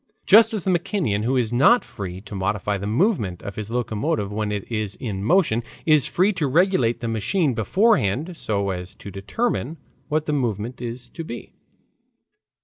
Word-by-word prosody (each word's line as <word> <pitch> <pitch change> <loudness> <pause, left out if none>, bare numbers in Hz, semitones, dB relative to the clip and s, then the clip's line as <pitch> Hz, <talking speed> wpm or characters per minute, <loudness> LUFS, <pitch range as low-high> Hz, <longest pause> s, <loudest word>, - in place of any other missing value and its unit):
Just 220 +3 +7
as 200 - -2
the 190 - +1
mechanician 170 - 0
who 125 +4 +1
is 120 -2 0
not 145 - +5
free 95 -3 -7
to 105 0 -11
modify 100 +1 -1
the 100 - -4
movement 110 - 0
of 100 - -6
his 105 -1 -5
locomotive 110 -3 -1
when 105 0 -2
it 100 -2 -4
is 110 -3 -2
in 100 -6 -4
motion, 155 - +3 0.2
is 155 -3 +4
free 190 +4 +2
to 165 -6 0
regulate 135 -7 +2
the 120 - -2
machine 120 - +1
beforehand 160 - +1
so 100 -8 -1
as 90 +1 -6
to 100 - -10
determine 150 - -2 0.3
what 155 0 0
the 150 - -1
movement 120 -3 -2
is 120 +1 -5
to 165 - -6
be. 120 -7 -8
120 Hz, 175 wpm, -23 LUFS, 105-165 Hz, 0.3 s, Just